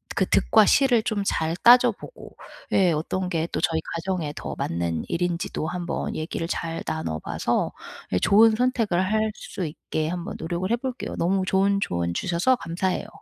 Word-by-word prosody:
그 - - +2
득과 - - +4
실을 250 -5 +4
좀 215 -3 -1
잘 160 -3 0
따져보고 245 - +3 0.4
예 185 -3 +4
어떤 180 +4 -2
게 165 -3 -1
또 - - -2
저희 160 -1 +1
가정에 165 -3 -3
더 70 -3 -6
맞는 85 -1 -2
일인지도 170 -2 -2
한번 175 0 -3
얘기를 165 +1 -3
잘 165 -1 -3
나눠봐서 80 0 -2 0.4
예 90 - +3
좋은 215 - +5
선택을 230 -7 +1
할 220 0 +1
수 180 - -6
있게 155 +1 -4
한번 180 +4 -4
노력을 175 +3 -3
해 - - +4
볼게요. 255 +1 -5
너무 190 +3 +1
좋은 195 +1 +2
조언 85 -1 -1
주셔서 180 +9 +2
감사해요. 185 -2 -2
175 Hz, 320 characters per minute, -24 LUFS, 160-200 Hz, 0.4 s, 좋은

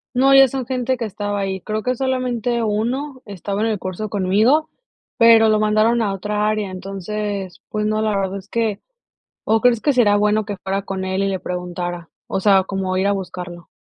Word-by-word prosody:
No, 270 +2 +5
ya 270 -1 +8
son 265 0 -3
gente 255 0 -1
que 235 - -4
estaba 205 -1 -3
ahí, 190 -1 -2
creo 215 +3 -3
que 250 +2 0
solamente 250 -2 -1
1 250 +6 -2
estaba 200 0 -4
en 225 - +1
el 215 -3 -1
curso 185 +4 -5
conmigo, 215 +10 +2 0.5
pero 230 -1 +7
lo 215 0 +3
mandaron 215 +2 +3
a 200 -3 0
otra 210 +2 -1
área. 215 -2 -1
Entonces, 195 +1 -5
pues 210 0 -2
no, 215 0 0
la 215 -2 0
verdad 195 0 -2
es 195 +1 -14
que 220 -3 -1 0.6
¿o 220 +1 +2
crees 245 -3 +3
que 290 - +2
será 215 -5 +4
bueno 210 +1 +2
que 205 -1 -4
fuera 195 +1 -1
con 190 -1 -4
él 190 +1 -1
y - - +1
le 190 -1 -2
preguntara? 175 -1 -5 0.2
O - - -2
sea, 195 -1 +4
como 190 -1 -3
ir 190 - +1
a 200 - +3
buscarlo. 180 -3 -6
210 Hz, 205 wpm, -20 LUFS, 195-230 Hz, 0.6 s, ya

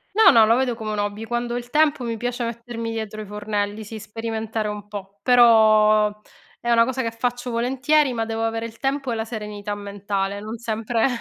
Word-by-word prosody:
No, 425 -4 +8
no, 225 -2 +7
lo 230 +2 +4
vedo 255 -2 +1
come 220 -2 -5
un 210 - -3
hobby, 205 +2 -2
quando 240 +1 -2
ho - - -1
il 245 0 -6
tempo 300 -3 +3
mi 230 -2 -3
piace 245 +2 -3
mettermi 230 0 -5
dietro 220 -1 -5
i 215 - -7
fornelli, 210 +1 -3
sì, 220 +1 -8
sperimentare 220 0 -4
un 210 0 -6
po'. 200 -1 -9
Però, 215 -3 +6 0.5
è 240 - -2
una 230 0 +6
cosa 260 +1 -2
che 230 - -1
faccio 245 +2 -3
volentieri, 265 +4 +2
ma 225 -1 -1
devo 225 0 -3
avere 225 0 -1
il 230 0 -12
tempo 270 -2 -1
e - - 0
la 220 0 -2
serenità 210 -2 -5
mentale, 200 -1 -3
non 215 +2 -6
sempre. 225 +1 0
225 Hz, 210 wpm, -23 LUFS, 210-240 Hz, 0.5 s, No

